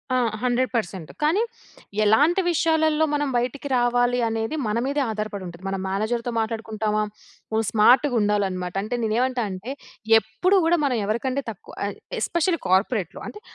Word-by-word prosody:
ఆ! -, -, +3 dB, 0.3 s
100% 230 Hz, -9 st, -1 dB
కానీ, 330 Hz, +8 st, +3 dB, 0.6 s
ఎలాంటి 290 Hz, -, +4 dB
విషయాలలో 315 Hz, -1 st, +2 dB
మనం 290 Hz, 0 st, +1 dB
బయటికి 255 Hz, +4 st, -2 dB
రావాలి 245 Hz, 0 st, +2 dB
అనేది 225 Hz, +5 st, -2 dB
మన 210 Hz, +1 st, 0 dB
మీదే 285 Hz, +1 st, 0 dB
ఆధారపడి 210 Hz, -2 st, -4 dB
ఉంటది. 170 Hz, +1 st, -11 dB
మన 195 Hz, -, -1 dB
మేనేజర్‌తో 225 Hz, +5 st, -1 dB
మాట్లాడుకుంటామా. 220 Hz, -1 st, -1 dB, 0.5 s
నువు 220 Hz, 0 st, +1 dB
స్మార్ట్‌గుండాలనమాట. 210 Hz, -6 st, +3 dB
అంటే 245 Hz, +3 st, -3 dB
నేను 215 Hz, -1 st, 0 dB
ఏమంటా 255 Hz, -1 st, +1 dB
అంటే 190 Hz, +8 st, -6 dB, 0.5 s
ఎప్పుడు, 220 Hz, -, 0 dB
గూడా 335 Hz, +2 st, +3 dB
మనం 250 Hz, -4 st, +1 dB
ఎవరికంటే 255 Hz, +6 st, -1 dB
తక్కువ 205 Hz, -, -10 dB
ఎ -, -, -1 dB, 0.3 s
ఎస్‌పెషియల్లి 340 Hz, 0 st, 0 dB
కార్పొరేట్‌లో. 190 Hz, 0 st, +1 dB
అంటే 420 Hz, -, -9 dB
230 Hz, 135 wpm, -24 LUFS, 210-275 Hz, 0.6 s, ఎలాంటి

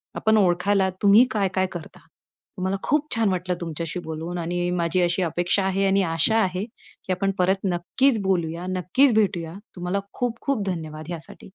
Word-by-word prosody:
आपण 220 Hz, 0 st, +3 dB
ओळखायला 190 Hz, +1 st, +3 dB
तुम्ही 210 Hz, +5 st, +7 dB
काय-काय 190 Hz, -3 st, +1 dB
करता? 175 Hz, -3 st, -9 dB, 0.6 s
मला 190 Hz, +1 st, 0 dB
खूप 300 Hz, +1 st, +1 dB
छान 225 Hz, -3 st, +2 dB
वाटलं 180 Hz, -1 st, -1 dB
तुमच्याशी 165 Hz, +1 st, -4 dB
बोलून 160 Hz, +2 st, -5 dB
आणि 175 Hz, +1 st, -2 dB
माझी 175 Hz, 0 st, +1 dB
अशी 175 Hz, +2 st, +1 dB
अपेक्षा 175 Hz, +3 st, 0 dB
आहे 195 Hz, +1 st, +1 dB
आणि 195 Hz, +1 st, +3 dB
आशा 220 Hz, +7 st, +2 dB
आहे, 185 Hz, 0 st, -1 dB
की 225 Hz, -4 st, -11 dB
आपण 195 Hz, +2 st, 0 dB
परत 190 Hz, +2 st, +2 dB
नक्कीच 210 Hz, +7 st, +1 dB
बोलूया, 175 Hz, -2 st, -1 dB
नक्कीच 185 Hz, +8 st, +3 dB
भेटूया. 175 Hz, -6 st, +1 dB, 0.2 s
तुम्हाला 180 Hz, +2 st, -2 dB
खूप 240 Hz, -2 st, -2 dB
खूप 255 Hz, -8 st, +1 dB
धन्यवाद 155 Hz, -3 st, -4 dB
ह्यासाठी. 170 Hz, +1 st, -8 dB
185 Hz, 160 wpm, -24 LUFS, 175-200 Hz, 0.6 s, तुम्ही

